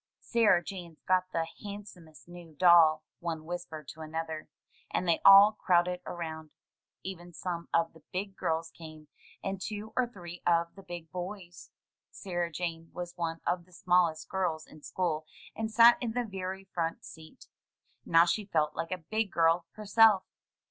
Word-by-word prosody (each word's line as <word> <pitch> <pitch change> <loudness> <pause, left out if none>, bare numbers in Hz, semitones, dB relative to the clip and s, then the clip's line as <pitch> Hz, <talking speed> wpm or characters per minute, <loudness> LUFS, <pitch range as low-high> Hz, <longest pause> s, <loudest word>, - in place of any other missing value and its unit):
"Sarah 210 -7 +3
Jane's 175 -4 -9
got 185 0 +1
the 165 -1 0 0.2
handsomest 200 -7 -10
new 175 -3 -12
doll," 160 -2 +6 0.2
one 165 -2 -4
whispered 165 -4 -6
to 160 - -10
another, 160 0 -5 0.4
and 180 - -2
they 170 - +2
all 195 +2 +10
crowded 180 -3 +1
around. 160 -2 -6 0.5
Even 175 -2 -8
some 170 +1 -5
of 165 0 +1
the 160 - -17
"big 195 +1 -4
girls" 165 -1 -2
came, 155 -2 -12 0.3
and 195 -1 -3
two 215 +2 -6
or 255 -1 +2
three 175 -6 -10
of 170 -1 +2
the 195 - -13
big 175 -4 -9
boys. 180 -1 -7 0.4
Sarah 175 -3 -3
Jane 165 -1 -4
was 175 0 -6
one 165 -1 -3
of 175 -1 -1
the 180 - -23
smallest 175 -3 +2
girls 175 -5 -2
in 155 - -16
school, 155 -2 -2 0.3
and 220 0 -2
sat 235 +2 +7
in 235 -3 -2
the 245 0 -1
very 190 -2 -5
front 170 -3 -3
seat. 160 -1 -13 0.6
Now 165 0 +5
she 200 +4 -1
felt 155 -5 0
like 165 +1 -3
a 185 - -1
big 220 -1 0
girl 165 +1 +2
herself. 215 -1 +4
175 Hz, 160 wpm, -30 LUFS, 165-190 Hz, 0.6 s, all